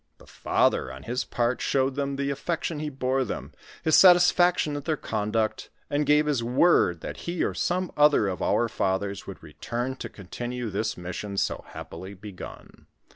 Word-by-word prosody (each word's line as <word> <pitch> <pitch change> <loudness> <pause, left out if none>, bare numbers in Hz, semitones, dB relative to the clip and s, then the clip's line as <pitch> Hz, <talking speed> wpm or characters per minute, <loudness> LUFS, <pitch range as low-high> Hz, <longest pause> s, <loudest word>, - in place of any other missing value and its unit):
The - - -17
father, 65 - +1
on 65 +2 -10
his 125 +2 -2
part, 120 +1 -1
showed 135 0 +1
them 140 0 -2
the 140 0 -1
affec 165 +4 -3
tion 160 -3 -2
he 150 0 -3
bore 135 -1 0
them, 110 - -5 0.3
his 160 - +4
satisfaction 175 -3 +5
at 145 -1 -5
their 155 -2 0
conduct, 110 -1 -2 0.2
and 145 +1 +1
gave 150 +1 +5
his 140 -6 0
word 120 - +3
that - - -6
he 170 0 -2
or - - 0
some 180 0 -1
other 150 -8 +5
of 95 -1 -3
our 120 - +2
fathers 100 -3 -2
would - - -9
return 120 +2 -4
to - - -6
continue 120 +4 -5
this 110 +3 -2
mission 95 +3 -5
so - - -1
happily 95 +2 -9
begun. 100 -1 -11
125 Hz, 180 wpm, -26 LUFS, 105-150 Hz, 0.3 s, satisfaction